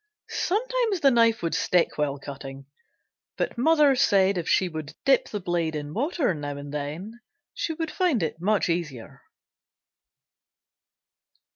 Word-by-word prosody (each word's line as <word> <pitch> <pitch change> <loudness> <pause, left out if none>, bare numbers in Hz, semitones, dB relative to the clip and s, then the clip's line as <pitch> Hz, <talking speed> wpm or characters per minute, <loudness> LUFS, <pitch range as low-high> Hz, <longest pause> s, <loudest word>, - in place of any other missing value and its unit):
Sometimes 455 -1 0
the 275 - +5
knife 230 -4 +3
would 165 - -1
stick 180 -2 +2
while 145 -2 -1
cutting, 135 0 -9 0.7
but - - -2
mother 295 +2 +4
said 195 -5 +3
if 175 -2 -3
she 185 - +3
would 155 -3 -7
dip 270 -2 +3
the 210 - -3
blade 175 -3 -1
in 145 0 -5
water 280 - 0
now 145 -2 -5
and 145 0 -8
then 160 +11 -5 0.3
she 325 - -2
would 325 -1 -3
find 350 - +1
it 160 +1 -4
much 210 +2 +2
easier. 165 -9 -4
180 Hz, 140 wpm, -25 LUFS, -, 0.7 s, the